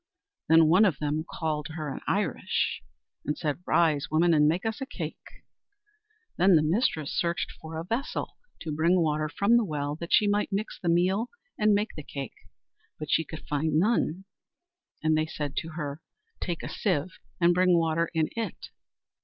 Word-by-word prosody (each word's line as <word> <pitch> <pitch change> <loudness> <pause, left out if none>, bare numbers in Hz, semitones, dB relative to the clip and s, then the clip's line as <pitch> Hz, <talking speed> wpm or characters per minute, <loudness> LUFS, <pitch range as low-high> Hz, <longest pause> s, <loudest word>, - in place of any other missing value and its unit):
Then 160 0 +7
one 180 +7 +5
of 185 -10 +3
them 150 +2 -1
called 150 -3 -2
to 155 - -10
her 155 -4 -4
in - - -6
Irish, - - 0 0.4
and 150 - -2
said, 150 0 -2
"Rise, 155 -4 +2
woman, 165 +2 +3
and 150 -1 +5
make 170 +7 0
us 225 +4 -2
a 270 - -3
cake." - - -8 0.9
Then 185 +1 +5
the 155 - +4
mistress 160 - 0
searched 170 0 -1
for 160 0 -7
a 160 - -3
vessel 230 +8 -3 0.3
to 160 - -4
bring 170 +4 +3
water 155 -2 0
from 200 +9 +3
the 235 - +3
well 145 -5 -3
that 170 +1 -7
she 210 - +5
might 205 +1 +1
mix 200 +3 -3
the 175 - -1
meal 185 +7 +2 0.3
and 215 -1 +3
make 210 +2 -1
the 150 - -6
cake, 140 -2 -6 0.6
but 155 0 -5
she 165 - +3
could 160 +1 -9
find 150 +1 0
none. 190 -1 +1 0.8
And 155 0 +3
they 155 0 +1
said 145 -3 -4
to 160 0 -3
her, 150 -1 -5 0.4
"Take 175 -2 -3
a - - -4
sieve 180 -4 -2 0.2
and 175 0 +5
bring 180 0 +4
water 165 0 +1
in 160 -1 +2
it." 230 -1 -4
165 Hz, 185 wpm, -28 LUFS, 155-185 Hz, 0.9 s, Then